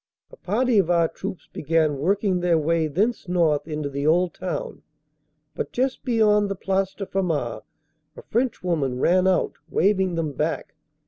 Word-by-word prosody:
A - - -12
party 230 +3 +1
of 180 -3 +1
our 170 -2 +3
troops 190 +2 -7
began 155 -2 +1
working 190 +3 +1
their 175 -2 +2
way 160 +1 +1
thence 205 - -1
north 165 -5 +1
into 150 -2 -3
the 140 +1 -2
old 175 +2 +3
town, 185 - -5 0.7
but - - -4
just 260 +1 -1
beyond 210 -4 +3
the 195 - -2
Place 195 0 -1
de 195 - -5
Famars 160 - -2 0.6
a - - -10
Frenchwoman 175 - -1
run 180 +7 +3
out, 185 -1 +2 0.2
waving 190 -1 +2
them 160 -3 -1
back. 135 - -3
180 Hz, 155 wpm, -24 LUFS, 155-195 Hz, 0.7 s, our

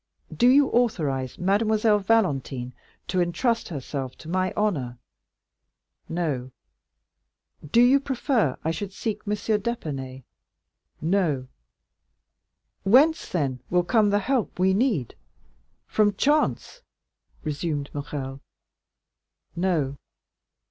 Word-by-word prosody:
Do 245 - +4
you 275 +2 +6
authorize 150 - 0
Mademoiselle 210 +3 +2
Valentine 140 - 0 0.3
to 185 - 0
intrust 225 +7 0
herself 135 -4 -5
to 155 - -12
my 185 +1 0
honor?" 140 - -1 1.1
"No." 150 -7 -2 1.1
"Do 230 +12 +4
you 265 +3 +6
prefer 260 - 0
I 160 - 0
should 190 +4 -5
seek 215 0 -3
M. 205 - +1
d'Épinay?" 160 - -3 0.8
"No." 160 -7 0 1.3
"Whence 275 +11 +4
then 135 -7 -1
will 180 0 +2
come 210 +3 +3
the 205 - +3
help 245 +2 -1
we 190 +1 +3
need—from 205 - -2
chance?" 300 - +1 0.6
resumed 150 -1 -3
Morrel. 140 -2 -5 1.1
"No." 165 -7 0
185 Hz, 95 wpm, -25 LUFS, 145-220 Hz, 1.3 s, you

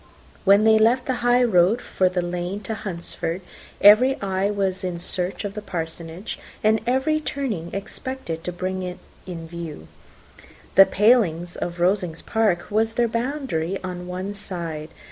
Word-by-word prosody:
When 200 +2 +6
they 220 0 +6
left 235 +4 +3
the 255 -1 -1
high 245 +1 +4
road 200 0 +4
for 185 -6 +1
the 180 -1 -1
lane 180 +3 -3
to 215 +2 -4
Hunsford, 175 -3 -4 0.4
every 250 +7 +7
eye 195 0 0
was 195 -2 -1
in 180 -2 -2
search 180 +3 -3
of 200 - -4
the 210 - -5
Parsonage, 165 0 -6 0.2
and 220 +1 +3
every 265 +5 +2
turning 225 - -3
expected 195 -4 -5
to 180 - -3
bring 185 +1 -3
it 180 -1 -5 0.3
in 165 -3 -6
view. 165 - -7 0.9
The 195 - +8
paling 205 -6 +3
of 175 0 -3
Rosings 180 -2 +1
park 210 -6 0
was 220 +1 +1
their 235 0 +2
boundary 230 - -2
on 180 -1 -5
one 185 +3 -4
side. 170 -6 -5
190 Hz, 155 wpm, -23 LUFS, 175-220 Hz, 0.9 s, The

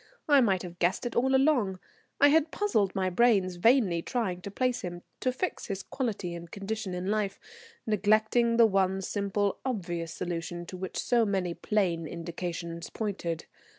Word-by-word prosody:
I 285 -3 +6
might 195 -6 +2
have 175 -1 -9
guessed 180 +7 +1
it 240 - -3
all 265 +2 +3
along. 265 -9 +3 0.4
I 285 - +7
had 315 +1 +4
puzzled 220 - 0
my 185 -1 0
brains 190 -4 +3
vainly 200 -4 +4
trying 190 -5 -2
to 200 - -6
place 250 +4 0
him, 175 -1 -6 0.2
to 255 - +1
fix 360 +9 -3
his 195 -3 -4
quality 210 -9 -3
and 170 0 -8
condition 200 0 -4
in 180 +1 -4
life, 210 -2 -1 0.5
neglecting 220 +3 +3
the 235 - +8
one 195 -2 +2
simple 200 0 -1
obvious 175 -9 -3
solution 175 0 -4
to 185 - -8
which 190 0 -5
so 240 -2 +2
many 190 -4 0
plain 175 -5 0
indications 170 0 -5
pointed. 180 -6 -3
195 Hz, 165 wpm, -29 LUFS, 175-230 Hz, 0.5 s, the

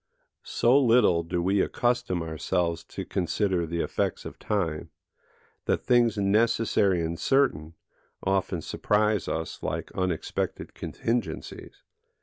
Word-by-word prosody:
So 125 +4 +4
little 115 -9 +4
do 85 +1 -2
we 95 +2 +2
accustom 120 -8 0
ourselves 85 +2 -1
to - - -7
consider 90 -1 0
the 85 +1 -2
effects - - -2
of - - -8
time, 85 -7 -2 0.8
that - - 0
things 120 -3 +3
necessary 100 -3 +2
and 80 +1 -3
certain 85 - +1 0.5
often 95 -3 0
surprise 105 -2 +1
us 80 0 -4
like - - -4
unexpected 90 -3 -3
contingencies. 115 -9 -4
95 Hz, 115 wpm, -27 LUFS, 85-115 Hz, 0.8 s, So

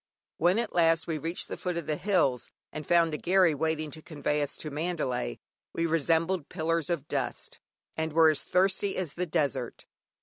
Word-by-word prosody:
When 175 +4 +3
at 235 -1 -2
last 165 -1 +3
we 160 -2 -2
reached 165 +3 -3
the - - -5
foot 180 -2 -3
of 170 - -3
the 155 - -1
hills, 155 - +1 0.2
and 155 -1 -7
found 170 -2 +4
a - - -1
"gharry" 185 -2 +4
waiting 155 0 -1
to 155 - -8
convey 150 -1 -2
us 145 -1 -2
to 155 - -5
Mandalay, 145 - -2 0.4
we 165 - 0
resembled 165 +1 +1
pillars 165 0 -1
of 160 -4 -2
dust, - - -3 0.4
and 160 0 -2
were 160 0 +6
as 150 - -1
thirsty 190 +2 +1
as 175 -6 -2
the 180 +1 -2
desert. 140 -6 -2
160 Hz, 190 wpm, -29 LUFS, 150-175 Hz, 0.4 s, were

